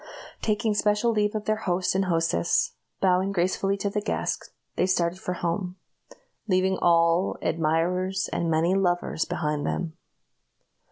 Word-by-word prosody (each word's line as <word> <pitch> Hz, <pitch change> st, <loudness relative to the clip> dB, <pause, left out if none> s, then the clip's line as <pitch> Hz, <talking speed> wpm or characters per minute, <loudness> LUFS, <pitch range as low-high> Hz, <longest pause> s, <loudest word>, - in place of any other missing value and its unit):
Taking 215 Hz, 0 st, +1 dB
special 210 Hz, +3 st, +2 dB
leave 210 Hz, -1 st, 0 dB
of 210 Hz, -1 st, -3 dB
their 215 Hz, 0 st, +1 dB
host 180 Hz, +1 st, +1 dB
and 190 Hz, +1 st, +1 dB
hostess, 165 Hz, -, +1 dB, 0.3 s
bowing 190 Hz, +1 st, +3 dB
gracefully 195 Hz, +2 st, 0 dB
to 200 Hz, -, -1 dB
the 210 Hz, 0 st, -1 dB
guests, 210 Hz, -, -2 dB, 0.3 s
they 180 Hz, -, +1 dB
started 180 Hz, -1 st, 0 dB
for 180 Hz, -, -3 dB
home 180 Hz, +1 st, -2 dB, 0.7 s
leaving 190 Hz, -1 st, +2 dB
all, 170 Hz, +2 st, +3 dB
admirers, 175 Hz, +4 st, 0 dB
and 170 Hz, -, 0 dB
many 165 Hz, +3 st, +2 dB
lovers 175 Hz, -4 st, 0 dB
behind 150 Hz, -2 st, -2 dB
them. 170 Hz, -3 st, -2 dB
185 Hz, 135 wpm, -26 LUFS, 170-195 Hz, 0.7 s, bowing